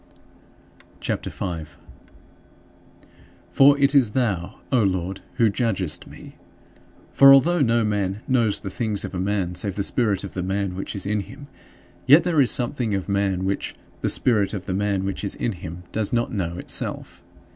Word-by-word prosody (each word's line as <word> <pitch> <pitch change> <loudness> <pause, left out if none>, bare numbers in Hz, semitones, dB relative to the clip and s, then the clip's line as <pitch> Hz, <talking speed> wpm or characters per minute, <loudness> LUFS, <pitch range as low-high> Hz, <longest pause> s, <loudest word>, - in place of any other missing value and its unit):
CHAPTER - - -3
V - - -14
7. 85 -5 -4 1.8
For 140 +1 +6
it 140 0 +3
is 125 -7 +4
thou, 100 -9 -1 0.2
O 125 -3 +3
Lord, 95 -1 -1
who 115 - +3
judgest 95 - -2
me. - - -13 0.8
For 135 0 +8
although 155 +5 +5
no 115 -3 +3
man 105 0 -2
"knows 115 -5 +1
the 95 - -6
things 110 -2 -2
of - - -8
a 90 - -3
man, 95 -2 -1
save 90 +2 -2
the 100 - -1
spirit 105 -2 0
of - - -7
the 95 - -3
man 95 +1 -2
which 95 +3 -6
is 100 - -4
in 105 +1 0
him," 140 +8 -9 0.6
yet 145 +5 +7
there 170 -4 +2
is 130 - +3
something 120 -4 0
of 95 +1 -4
man 100 -2 0
which 100 +1 -3 0.3
"the - - 0
spirit 105 -5 +1
of 95 - -6
the 95 - -3
man 100 -1 -1
which 100 +1 -4
is 100 - -2
in 120 - -2
him" 90 -2 -8
does 110 -2 -1
not 120 +1 0
know 90 -4 -3
itself. 90 -1 -4
100 Hz, 180 wpm, -23 LUFS, 95-120 Hz, 1.8 s, For